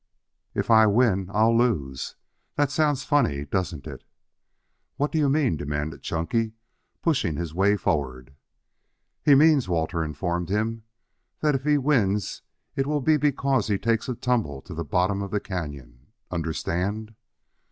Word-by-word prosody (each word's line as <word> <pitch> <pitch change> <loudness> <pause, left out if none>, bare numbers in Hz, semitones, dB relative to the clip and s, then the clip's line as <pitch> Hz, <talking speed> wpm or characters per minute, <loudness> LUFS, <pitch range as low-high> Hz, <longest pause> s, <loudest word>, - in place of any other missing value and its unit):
"If - - 0
I 110 -1 +7
win, 100 -4 +2
I'll 110 +2 +3
lose. 80 - 0 0.4
That 145 -1 +1
sounds 145 -2 +1
funny, 115 - +1
doesn't 80 -2 -3
it?" - - -8 0.9
"What 145 +1 0
do 160 - 0
you 145 -2 +3
mean?" 135 - +2
demanded 75 +2 -4
Chunky, 110 +7 -1 0.5
pushing 130 - +1
his 85 -1 -4
way 100 +4 +3
forward. 65 -6 -2 0.9
"He 145 -2 +6
means," 145 -6 +5
Walter 85 0 0
informed 85 +3 -3
him, 110 +2 -1 0.6
"that 150 -1 +3
if 135 0 -2
he 150 -1 +4
wins 110 -9 +1 0.3
it 135 -1 0
will 150 -1 0
be 155 +3 +4
because 140 -3 +1
he 105 -2 +1
takes 115 +3 0
a 125 - -2
tumble 110 - -1
to - - -9
the 85 +1 -3
bottom 95 +6 0
of 100 - -4
the 105 - 0
canyon. 70 -10 -7 0.2
Understand?" 90 +6 -2
105 Hz, 150 wpm, -25 LUFS, 80-135 Hz, 0.9 s, I